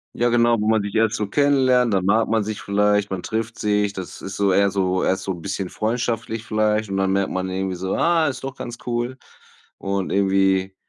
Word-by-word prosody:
Ja 120 Hz, -, +1 dB
genau, 120 Hz, -1 st, +3 dB
wo 105 Hz, -, -1 dB
man 110 Hz, -1 st, +3 dB
sich 100 Hz, -1 st, -5 dB
erst 110 Hz, 0 st, +2 dB
so 105 Hz, -, -1 dB
kennenlernt, 130 Hz, -2 st, +3 dB
dann 95 Hz, -2 st, +1 dB
mag 110 Hz, +4 st, +2 dB
man 110 Hz, -1 st, +1 dB
sich 105 Hz, 0 st, -5 dB
vielleicht, 105 Hz, 0 st, +1 dB
man 95 Hz, -2 st, -3 dB
trifft 115 Hz, +1 st, -3 dB
sich, 105 Hz, -1 st, 0 dB
das 95 Hz, -3 st, -8 dB
ist 95 Hz, 0 st, -6 dB
so 100 Hz, -1 st, +2 dB
eher 100 Hz, +2 st, +3 dB
so 95 Hz, -1 st, 0 dB
erst 95 Hz, +1 st, 0 dB
so 95 Hz, -, -2 dB
bisschen 95 Hz, +2 st, -4 dB
freundschaftlich 115 Hz, 0 st, -2 dB
vielleicht 110 Hz, -1 st, 0 dB
und 95 Hz, -, -2 dB
dann 95 Hz, 0 st, +1 dB
merkt 100 Hz, 0 st, 0 dB
man 95 Hz, 0 st, -2 dB
irgendwie 95 Hz, 0 st, -2 dB
so: 95 Hz, +1 st, -2 dB
„Ah, 165 Hz, -2 st, +2 dB
ist 130 Hz, -2 st, -4 dB
doch 135 Hz, -1 st, -5 dB
ganz 120 Hz, 0 st, -6 dB
cool.“ 120 Hz, +1 st, -2 dB, 0.6 s
Und 95 Hz, -1 st, -3 dB
irgendwie 95 Hz, -1 st, +2 dB
105 Hz, 215 wpm, -22 LUFS, 95-115 Hz, 0.6 s, genau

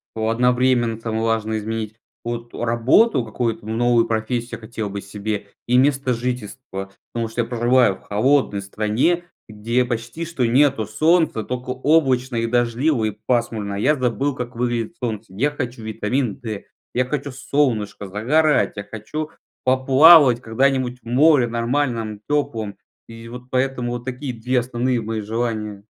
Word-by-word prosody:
одновременно 120 Hz, +1 st, +2 dB
там 115 Hz, -1 st, -3 dB
важно 110 Hz, -1 st, 0 dB
изменить 110 Hz, 0 st, -4 dB, 0.3 s
вот 120 Hz, 0 st, -5 dB
работу, 120 Hz, -, +3 dB
какую-то 110 Hz, -1 st, -3 dB
новую 115 Hz, +1 st, +2 dB
профессию 115 Hz, +2 st, -2 dB
хотел 110 Hz, -2 st, -5 dB
бы 100 Hz, 0 st, -5 dB
себе, 105 Hz, 0 st, -4 dB, 0.2 s
и 125 Hz, -, +4 dB
место 135 Hz, -1 st, +2 dB
жительства. 115 Hz, -4 st, -5 dB, 0.2 s
Потому 115 Hz, -1 st, -2 dB
что 115 Hz, +2 st, -1 dB
я 115 Hz, -, -3 dB
проживаю 120 Hz, -3 st, +3 dB
в -, -, -19 dB
холодной 110 Hz, -1 st, +1 dB
стране, 110 Hz, -, 0 dB, 0.2 s
где 115 Hz, +4 st, 0 dB
почти 120 Hz, +7 st, -4 dB
что 155 Hz, -7 st, -1 dB
нету 130 Hz, -1 st, +3 dB
солнца, 155 Hz, -, +2 dB
только 125 Hz, 0 st, -5 dB
облачно 130 Hz, -2 st, +2 dB
и 115 Hz, 0 st, 0 dB
дождливо 120 Hz, +2 st, +1 dB
и 105 Hz, -, -3 dB
пасмурно. 115 Hz, -4 st, -1 dB
Я 130 Hz, +10 st, +2 dB
забыл, 130 Hz, +2 st, -1 dB
как 125 Hz, -1 st, -6 dB
выглядит 120 Hz, +5 st, -2 dB
солнце. 110 Hz, -3 st, -3 dB
Я 135 Hz, +9 st, +1 dB
хочу 125 Hz, -5 st, -5 dB
витамин 110 Hz, +1 st, -1 dB
Д, 110 Hz, -4 st, -5 dB, 0.3 s
я 125 Hz, +1 st, +1 dB
хочу 140 Hz, 0 st, -3 dB
солнышко, 125 Hz, -7 st, -1 dB
загорать, 145 Hz, +11 st, +2 dB
я 100 Hz, -, -5 dB
хочу 130 Hz, +10 st, -6 dB, 0.3 s
поплавать 130 Hz, 0 st, +6 dB
когда-нибудь 125 Hz, +1 st, 0 dB
в -, -, -33 dB
море, 135 Hz, +1 st, +4 dB
нормальном, 115 Hz, -2 st, -1 dB
теплом. 115 Hz, -8 st, -1 dB, 0.3 s
И 115 Hz, 0 st, -11 dB
вот 125 Hz, +1 st, -10 dB
поэтому, 125 Hz, -2 st, -1 dB
вот 120 Hz, -, -5 dB
такие 130 Hz, 0 st, -4 dB
2 125 Hz, +2 st, 0 dB
основные 120 Hz, 0 st, -1 dB
мои 110 Hz, 0 st, -3 dB
желания. 110 Hz, -2 st, -3 dB
120 Hz, 145 wpm, -21 LUFS, 110-130 Hz, 0.3 s, поплавать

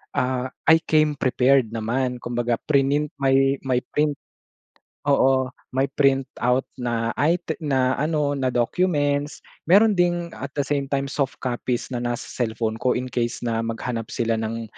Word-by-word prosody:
ah, 125 Hz, 0 st, 0 dB, 0.2 s
I 160 Hz, 0 st, +7 dB
came 155 Hz, -2 st, +2 dB
prepared 130 Hz, -3 st, +2 dB
naman 125 Hz, +2 st, -2 dB
kumbaga 120 Hz, 0 st, -1 dB
prinint 145 Hz, +1 st, +2 dB
may 135 Hz, 0 st, +3 dB
may 125 Hz, -1 st, +1 dB
print 150 Hz, 0 st, +1 dB, 0.9 s
oo. 130 Hz, -2 st, +3 dB, 0.2 s
May 135 Hz, +1 st, +1 dB
print 135 Hz, -2 st, +2 dB, 0.2 s
out 125 Hz, +2 st, +2 dB
na 115 Hz, -2 st, -1 dB
ay 165 Hz, +4 st, +3 dB, 0.2 s
na 130 Hz, -4 st, +1 dB
ano 150 Hz, -1 st, +1 dB
na 130 Hz, -, -1 dB
documents 145 Hz, +3 st, 0 dB, 0.3 s
meron 210 Hz, +5 st, +6 dB
ding 175 Hz, -2 st, +1 dB
at 140 Hz, -, -5 dB
the 140 Hz, -, +2 dB
same 140 Hz, -1 st, -1 dB
time 140 Hz, -1 st, 0 dB
soft 140 Hz, -1 st, -1 dB
copies 125 Hz, 0 st, -2 dB
na 120 Hz, -, -1 dB
nasa 120 Hz, 0 st, -3 dB
cellphone 110 Hz, -2 st, -2 dB
ko 125 Hz, -, +2 dB
in 125 Hz, -, -2 dB
case 120 Hz, -1 st, -2 dB
na 115 Hz, -1 st, 0 dB
maghanap 115 Hz, 0 st, -3 dB
sila 115 Hz, -1 st, -1 dB
ng 115 Hz, +1 st, -3 dB
130 Hz, 155 wpm, -23 LUFS, 120-145 Hz, 0.9 s, I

